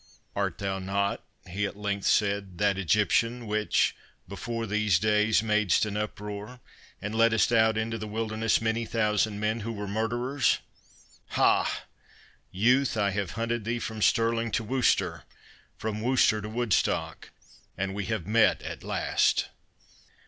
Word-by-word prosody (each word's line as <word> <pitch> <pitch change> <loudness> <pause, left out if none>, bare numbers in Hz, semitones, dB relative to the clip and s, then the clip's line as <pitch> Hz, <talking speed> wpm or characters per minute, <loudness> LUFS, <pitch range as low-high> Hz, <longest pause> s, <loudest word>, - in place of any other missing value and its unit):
"Art - - -2
not 100 +1 -1 0.2
thou," 90 - -13
he 100 +3 -1
at 100 - -9
length 100 -1 -2
said, 100 -3 +1
"that 100 0 +2
Egyptian 115 +5 +1
which, 105 0 +1 0.3
before 115 +4 -4
these 105 -3 +2
days, 105 +2 +2
madest 105 -3 +2
an 105 -1 -4
uproar, 105 +2 -5 0.4
and 105 +2 -5
leddest 115 0 +3
out 110 -1 +4
into 110 +1 -2
the 110 - -5
wilderness 110 +1 0
many 115 +1 0
thousand 105 -2 0
men, 110 +2 0
who 115 +1 -4
were 105 -2 -5
murderers!—Ha, 120 +6 -1 0.7
youth, 125 +6 +2
I 100 -2 +2
have 100 -2 -3
hunted 115 0 -1
thee 115 +3 -1
from 110 -2 -5
Stirling 115 +1 +2
to 115 - 0
Worcester, 125 +2 +1 0.6
from 110 -1 -4
Worcester 120 -3 +3
to 105 - -6
Woodstock, 115 -3 -1 0.5
and 95 0 -2
we 100 0 -3
have 110 -6 -3
met 110 +3 +3
at - - -7
last!" - - +1
110 Hz, 140 wpm, -27 LUFS, 100-115 Hz, 0.7 s, out